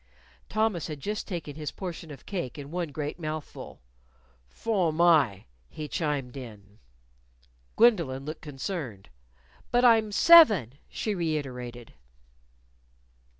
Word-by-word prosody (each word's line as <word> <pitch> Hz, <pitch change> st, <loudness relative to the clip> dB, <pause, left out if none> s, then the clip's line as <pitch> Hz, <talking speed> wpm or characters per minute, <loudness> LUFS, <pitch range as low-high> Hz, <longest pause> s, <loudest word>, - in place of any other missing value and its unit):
Thomas 215 Hz, -7 st, 0 dB
had 150 Hz, -2 st, -6 dB
just 210 Hz, +9 st, -4 dB
taken 165 Hz, -7 st, -5 dB
his 150 Hz, -1 st, -5 dB
portion 170 Hz, -3 st, -7 dB
of 140 Hz, -4 st, -11 dB
cake 175 Hz, -11 st, -4 dB
in 145 Hz, 0 st, -8 dB
one 175 Hz, -3 st, -3 dB
great 150 Hz, +3 st, -5 dB
mouthful. 155 Hz, -, -7 dB, 0.7 s
"Fo'm 185 Hz, -, -1 dB
my," 155 Hz, -, +3 dB, 0.2 s
he 150 Hz, -, -7 dB
chimed 145 Hz, -6 st, -2 dB
in. 105 Hz, -6 st, -11 dB, 1.0 s
Gwendolyn 170 Hz, -, +3 dB
looked 155 Hz, +1 st, -6 dB
concerned. 135 Hz, -, -6 dB, 0.6 s
"But 245 Hz, +1 st, +3 dB
I'm 225 Hz, -3 st, +5 dB
seven," 205 Hz, -, +7 dB, 0.2 s
she 215 Hz, -, -3 dB
reiterated. 130 Hz, -, -4 dB
155 Hz, 110 wpm, -27 LUFS, 135-190 Hz, 1.0 s, seven